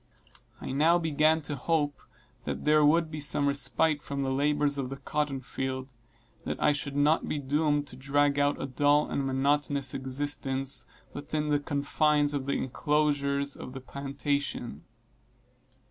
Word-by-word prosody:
I - - -6
now 155 +6 +4
began 160 -1 +2
to 145 0 -3
hope 145 +1 -1 0.4
that - - -4
there 150 0 +4
would 160 +2 +3
be 155 - -5
some 145 0 +1
respite 145 +2 +2
from 140 -1 -4
the 135 - -1
labors 145 +1 +1
of 130 -2 -3
the 135 - -6
cotton 145 -2 -2
field, 130 0 -4 0.5
and - - -10
that - - -3
I - - +4
should 145 -1 -3
not 150 +3 +2
be - - -2
doomed 145 +1 0
to 140 - -8
drag 140 +2 +1
out 145 0 +1
a - - -3
dull 145 +2 +2
and 140 - -1
monotonous 140 0 +1
existence, 135 -1 -1 0.3
within 150 +1 -3
the 145 -1 +2
confines 145 +1 +1
of 140 -2 -3
the 140 - 0
enclosures 140 0 0
of 125 - -9
the 135 - -6
plantation. 140 -1 -4
145 Hz, 160 wpm, -28 LUFS, 135-150 Hz, 0.5 s, now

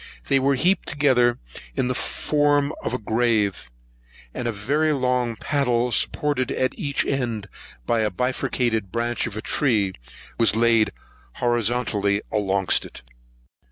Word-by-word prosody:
They 135 -1 +4
were 135 +1 +2
heaped 180 +7 +1
together 130 -5 +3 0.4
in 125 - 0
the 125 - 0
form 145 +2 +1
of 125 - -2
a - - 0
grave, 110 - 0 0.6
and 120 - -3
a - - 0
very 145 +10 0
long 125 -3 0
paddle, 125 -2 0
supported 145 0 0
at 130 - 0
each 145 -8 -1
end 120 -7 -2 0.4
by 115 - +1
a 110 -1 +1
bifurcated 115 -2 -1
branch 120 0 -1
of 110 -2 -7
a 110 - -5
tree, 110 -10 +1 0.5
was 115 -3 +4
laid 115 -1 +3 0.4
horizontally 115 -4 0
alongst 100 -3 +1
it. - - -11
120 Hz, 135 wpm, -23 LUFS, 110-135 Hz, 0.6 s, They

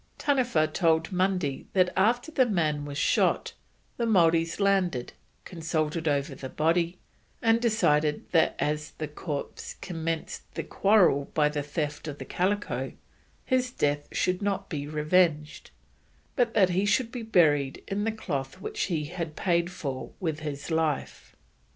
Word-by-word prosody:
Taniwha 255 - +2
told 160 -1 +2
Mundy 180 -6 0
that 185 -2 +3
after 240 +10 +2
the 260 -5 +3
man 155 -8 0
was 145 -1 -6
shot, - - +2 0.4
the 235 - 0
Maoris 165 -5 +3
landed, 185 -10 +1 0.3
consulted 160 -1 -2
over 140 0 0
the 130 0 -7
body, 170 +4 +1 0.4
and 225 0 +3
decided 155 -10 +2
that 165 - +3
as 150 +1 -2
the 155 - -3
corpse 150 -1 -6
"commenced 165 -2 -4
the - - -2
quarrel 190 -9 +3
by 150 -1 +4
the 150 0 -2
theft 145 +1 -4
of 145 -2 -5
the - - -7
calico, 205 +3 -1 0.5
his 255 -1 +1
death 145 - -1
should 180 +1 0
not 200 -1 -2
be 145 -3 -4
revenged, 155 0 +1 0.7
but 240 -3 +1
that 195 -4 +5
he 185 +3 +1
should 225 +4 +1
be 245 - -5
buried 150 -11 +2
in 200 +1 -1
the 225 - +1
cloth 140 -8 -4
which - - -2
he 165 -5 -1
had 165 -1 -5
paid 170 -1 +1
for 140 -8 -5
with 160 -5 -2
his 150 0 -5
life." 160 -3 -2
165 Hz, 150 wpm, -27 LUFS, 150-195 Hz, 0.7 s, that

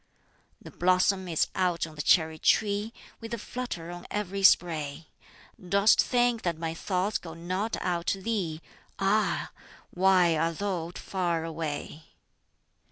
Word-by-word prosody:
"The - - -12
blossom 185 +1 +2
is 165 -3 +1
out 180 -3 0
on 160 - -11
the 150 - -4
cherry 160 +1 +3
tree, 210 +1 +2 0.3
With 230 0 -5
a - - -7
flutter 210 -8 -6
on 175 0 -9
every 200 -1 -3
spray. 160 -5 +2 0.6
Dost 200 +3 +5
think 245 -2 +1
that 170 -3 -1
my 165 0 -3
thoughts 185 +4 -1
go 165 -2 -9
not 185 +6 -2
out 175 -2 -1
to 195 - 0
thee? 180 -8 -2 0.3
Ah, 205 +2 +1 0.4
why 180 -2 +4
art 165 +1 0
thou 185 -5 -2
far 175 -4 -2
away!" 160 -1 -5
180 Hz, 140 wpm, -28 LUFS, 165-200 Hz, 0.6 s, Dost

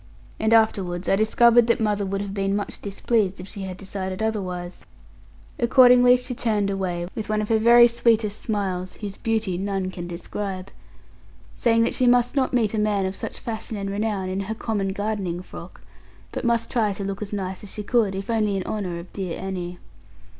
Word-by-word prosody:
And 220 +1 +1
afterwards 195 -6 +2
I - - +4
discovered 235 +3 +5
that 235 - +2
mother 210 -2 0
would 195 +1 -2
have 200 -1 -5
been 195 0 0
much 205 - -4
displeased, 200 -1 0
if 185 - -8
she 200 0 -7
had 185 -1 -5
decided 190 0 -5
otherwise. 180 -5 -3 0.8
Accordingly 250 0 +6
she 250 0 -5
turned 210 -4 0
away, 180 -3 -2
with 220 -2 -5
one 215 0 +1
of 210 - -2
her 225 -1 +3
very 235 +2 +7
sweetest 225 -3 +1
smiles 190 -4 -2
(whose 200 -2 -5
beauty 220 -5 -1
none 195 -1 -2
can 175 -1 -6
describe) 185 +2 -5 0.8
saying 230 -1 +2
that - - 0
she 255 - +2
must 245 +2 +3
not 265 -2 +1
meet 230 -4 +1
a 220 - 0
man 210 -2 +1
of 190 +1 -3
such - - -6
fashion 220 -1 -5
and 195 0 -3
renown, 205 -2 -1
in 185 +1 -2
her 205 +3 -3
common 205 -4 -2
gardening 195 -4 -3
frock; - - -11 0.5
but - - -4
must 235 -1 +1
try 220 -5 +1
to 200 - -5
look 195 +1 -4
as 205 - -5
nice 190 -2 -4
as 205 - -9
she 210 - -5
could, 210 -3 +1
if 195 +1 -5
only 210 -3 +1
in 190 - -2
honour 185 -5 -3
of 170 +2 -10
dear 185 -4 -4
Annie. 180 -2 -5
205 Hz, 195 wpm, -24 LUFS, 190-225 Hz, 0.8 s, very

